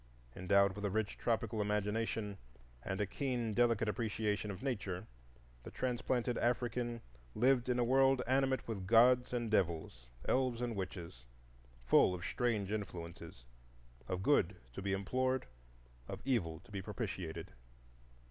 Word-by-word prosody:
Endowed 100 +1 +3
with 105 - -6
a 100 - +1
rich 105 +1 -1
tropical 115 -1 0
imagination 105 0 -1 0.4
and 95 +5 -3
a 105 - +2
keen, 120 0 -2
delicate 115 -1 +3
appreciation 105 0 -1
of 100 +4 -6
Nature, 100 -9 -2 0.6
the - - -9
transplanted 125 -1 -1
African 120 0 0 0.3
lived 125 +1 +3
in 125 - +2
a 120 - +3
world 135 +1 +4
animate 130 0 +1
with 100 -5 -4
gods 125 +3 +6
and 120 -3 -2
devils, 80 - 0 0.2
elves 130 -3 +1
and 120 -2 -2
witches; 90 -9 -6 0.6
full 90 - +5
of 85 - -6
strange 110 -6 0
influences,—of - - -7
Good - - +3 0.2
to - - -6
be 100 0 -1
implored, 130 +7 0 0.6
of - - -5
Evil 90 -12 0
to - - -19
be 100 -2 -3
propitiated. 95 -5 -5
105 Hz, 135 wpm, -35 LUFS, 95-120 Hz, 0.6 s, gods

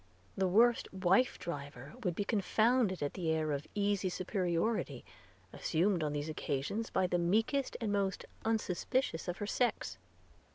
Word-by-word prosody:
The 190 -1 +1
worst 230 +6 +4
wife 190 +6 +3
driver 140 -4 -6
would 180 -4 0
be 205 - 0
confounded 215 - +2
at 145 - -2
the 175 -4 -2
air 155 -1 +1
of 145 +1 -3
easy 200 -2 +1
superiority 180 - -1 0.5
assumed 175 +2 +1
on 150 - 0
these 145 +1 -2
occasions 155 +8 -2
by 185 - +1
the 175 -1 +1
meekest 220 +10 +1
and 225 -4 -1
most 195 -2 0 0.2
unsuspicious 220 -2 0
of 175 +1 -2
her 205 - -3
sex. 210 - -1
185 Hz, 150 wpm, -33 LUFS, 160-215 Hz, 0.5 s, worst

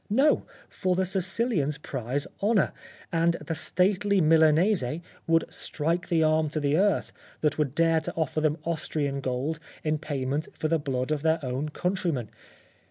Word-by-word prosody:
No; 270 +8 +3 0.2
for 185 -1 -1
the 190 +1 +1
Sicilians 185 - 0
prize 135 -1 -3 0.2
honour, 205 0 +3 0.4
and 170 0 +3
the 165 - -5
stately 195 +4 +1
Milanese 160 +3 +4 0.4
would 165 0 +3
strike 165 +4 -1
the 165 -2 +3
arm 155 0 +2
to 155 - -2
the 145 0 +1
earth 195 +1 +1 0.3
that 150 0 +1
would 145 -2 0
dare 165 -1 +3
to - - -4
offer 160 -1 -1
them 155 0 +1
Austrian 150 -4 -1
gold 135 +5 -2 0.2
in 155 -1 0
pay 140 -4 -3
ment 145 +4 -1
for 155 - -1
the 165 0 +2
blood 130 -1 -2
of 150 -2 0
their 160 +1 +3
own 130 +4 -2
countrymen. 170 - -1
160 Hz, 165 wpm, -27 LUFS, 145-180 Hz, 0.4 s, Milanese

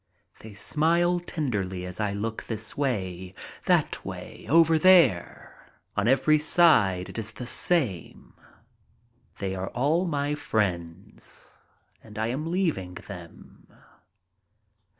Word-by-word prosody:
They 110 -2 -11
smile 170 - +2
tenderly 105 - -3
as 90 +2 -8
I 105 -2 0
look 110 +3 -4
this 110 -1 -4
way, 95 -9 -3 0.3
that - - +1
way, - - -8
over 165 0 +5
there 170 - +3 0.2
— - - -46
on 105 +1 +1
every 135 +4 +4
side 115 - +4
it - - -6
is 105 -1 -6
the 125 - -7
same. 125 - -2 1.0
They 95 -1 -3
are 95 0 -4
all 155 +9 +1
my 145 -2 -1
friends 95 - -3 0.5
and 105 -1 -13
I 110 +1 -1
am 150 +6 -3
leaving 160 - -1
them. 90 -5 -12
115 Hz, 120 wpm, -26 LUFS, 95-155 Hz, 1.0 s, over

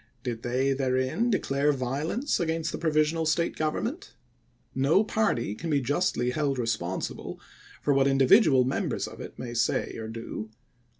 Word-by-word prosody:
Did 120 -3 -4
they 130 +3 +1
therein 130 - 0
declare 145 -8 +1
violence 145 - -1
against 165 -1 -1
the - - -5
provisional 160 0 +1
State 170 +2 +1
government? 220 - -3 0.6
No 140 +10 +3
party 205 - 0
can 165 +10 -6
be 145 -2 +3
justly 130 -2 0
held 140 -1 0
responsible 105 -7 -3 0.4
for 145 - +3
what 135 0 +3
individual 135 - +5
members 130 +2 -1
of - - -10
it - - -9
may 120 -2 -6
say 120 - 0
or 110 - -5
do. 115 -1 -6
135 Hz, 145 wpm, -27 LUFS, 125-160 Hz, 0.6 s, individual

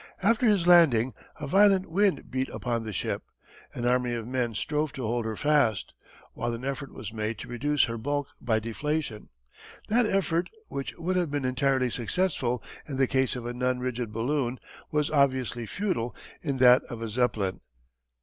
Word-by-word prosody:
After 230 +4 +3
his 200 -5 +3
landing 140 -9 +6 0.3
a 150 - -4
violent 195 +3 +5
wind 195 +3 +1
beat 130 0 -1
upon 120 -2 -2
the 110 - -5
ship. 95 - -2 0.5
An 120 - -3
army 125 -1 +2
of 115 -1 -5
men 125 -3 -1
strove 150 +6 -1
to 135 -4 -5
hold 120 +1 -1
her 110 -1 -2
fast, 140 -7 +2 0.4
while 120 0 -2
an 120 +3 -7
effort 140 0 -4
was 110 -1 -8
made 110 0 -2
to - - -8
reduce 145 +4 +1
her 115 -1 -2
bulk 145 +3 -2
by 110 -2 +1
deflation. 115 +1 -3 0.6
That 230 +1 +3
effort, 175 -4 +1 0.2
which 135 - -4
would 185 +2 -1
have 175 -3 +1
been 145 -2 -2
entirely 130 0 +1
successful 125 - -1 0.2
in 140 -3 -4
the 135 - +4
case 130 0 +2
of 120 -2 -6
a 120 - -3
non 125 +1 0
rigid 125 -3 -3
balloon, 125 +2 -1 0.3
was 150 -1 0
obviously 130 -5 +1
futile 125 - -2 0.3
in 140 -4 -2
that 125 0 +7
of 115 -2 -7
a - - -2
Zeppelin. 110 -4 0
130 Hz, 180 wpm, -27 LUFS, 120-150 Hz, 0.6 s, that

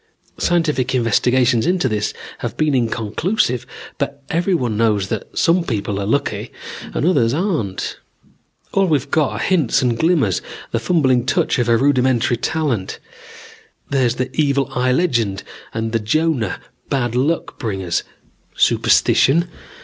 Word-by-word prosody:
Scientific 150 -7 +1
investigations 125 0 +2
into 180 -6 +2
this 105 -3 -1 0.3
have - - -5
been 155 -2 +1
inconclusive, 125 - 0 0.3
but 140 0 -3
everyone 165 - 0
knows 105 -3 +1
that - - -5
some 170 +1 +3
people 105 -7 -2
are 100 - -3
lucky 140 +6 -1 0.4
and - - 0
others 135 -9 +3
aren't. 155 - -2 0.8
All 195 -1 +3
we've 145 -4 0
got 155 -3 +2
are - - -4
hints 145 - +1
and 120 -2 +1
glimmers, 150 - +2 0.3
the 115 - 0
fumbling 130 -3 +2
touch - - +1
of 120 -1 +1
a 115 - +5
rudimentary 130 -2 +2
talent. 135 - -2 0.9
There's 130 -4 +2
the 130 +1 -4
evil 140 -3 +1
eye 125 0 +1
legend 115 - 0 0.3
and 115 0 -3
the 115 - +1
Jonah, 145 +2 0 0.3
bad 120 -4 0
luck 140 +7 -1
bringers. 95 -6 -2 0.6
Superstition? 170 +6 +3
130 Hz, 135 wpm, -19 LUFS, 115-155 Hz, 0.9 s, a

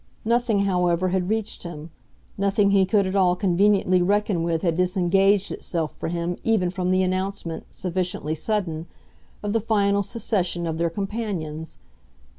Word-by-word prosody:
Nothing, 235 -2 +2
however, 180 -2 +1
had 185 0 0
reached 220 0 -2
him; 165 -2 -8 0.4
nothing 200 0 +2
he 195 -1 +4
could 200 0 +3
at 190 +1 -2
all 180 -2 +4
conveniently 185 0 +3
reckon 200 -1 +1
with 165 -1 -1
had 170 -3 +1
disengaged 190 +2 +2
itself 165 -3 -3
for - - -5
him 175 +1 -2
even 205 -6 +2
from 180 -1 -2
the 185 0 +3
announcement, 185 -2 -3
sufficiently 180 -3 -3
sudden, 170 -2 -2 0.6
of 205 0 -1
the 225 - +2
final 200 -2 +2
secession 190 -4 -1
of 160 -1 -3
their 170 0 +1
companions. 185 -5 -4
185 Hz, 150 wpm, -24 LUFS, 175-200 Hz, 0.6 s, he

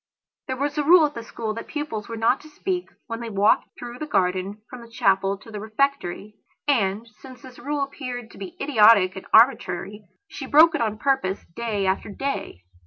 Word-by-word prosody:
There 260 - -3
was 290 +2 -2
a - - +1
rule 330 +2 +7
at 295 - -3
the 230 - -6
school 225 -1 -5
that 230 - -7
the - - -14
pupils 295 -9 -4
were 230 - -5
not 230 +4 +2
to 310 - -14
speak 360 +3 -3 0.2
when 230 -1 -5
they 235 -1 -6
walked 200 0 +2
through 245 0 -8
the 305 - -5
garden 195 -1 -1
from 250 -2 -10
the 235 - -13
chapel 195 -3 +1
to 225 - -15
the 210 - -6
refectory. 215 -3 -2 0.3
And, 220 -5 +1
since 260 -2 -13
this 255 -1 -13
rule 290 +1 -2
appeared 250 -4 -6
to - - -14
be 195 -2 -8
idiotic 215 -8 +5
and 190 - -9
arbitrary, 210 -4 +3 0.2
she 270 - -8
broke 320 +4 +6
it 310 - -1
on 215 -2 -1
purpose 265 -6 -1
day 220 -4 -2
after 190 +2 -1
day. 235 - -5
230 Hz, 205 wpm, -24 LUFS, 205-275 Hz, 0.3 s, rule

